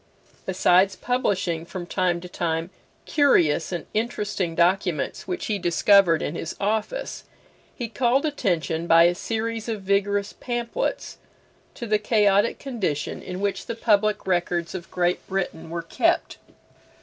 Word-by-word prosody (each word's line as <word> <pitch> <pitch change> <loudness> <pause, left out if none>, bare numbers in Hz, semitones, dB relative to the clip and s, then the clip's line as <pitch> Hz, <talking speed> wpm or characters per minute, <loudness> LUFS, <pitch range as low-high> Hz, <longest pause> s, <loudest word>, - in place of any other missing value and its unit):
Besides 190 +1 +3
publishing, 185 -8 -1
from 175 +1 -7
time 175 -1 0
to 180 - -8
time, 165 0 -2 0.3
curious 170 - +3
and 175 -3 -4
interesting 210 -6 -2
documents 175 -2 0
which 180 - -3
he 210 -2 -1
discovered 175 -1 +4
in - - -3
his 165 -1 -5
office, 220 - -2 0.5
he 240 - -4
called 250 +4 +1
attention, 170 - -1
by 165 0 +7
a 175 +1 +4
series 225 +3 -3
of 215 -3 -4
vigorous 200 +1 0
pamphlets, 240 -1 -3 0.6
to 235 - -6
the 215 -1 +2
chaotic 210 -1 +3
condition 210 - -3
in 185 +1 -6
which 200 -1 -2
the 230 - -3
public 215 -2 +2
records 175 -2 0
of 180 -2 -7
Great 180 0 -1
Britain 180 -4 -3
were 170 0 -4
kept. 165 - 0
195 Hz, 135 wpm, -24 LUFS, 175-215 Hz, 0.6 s, by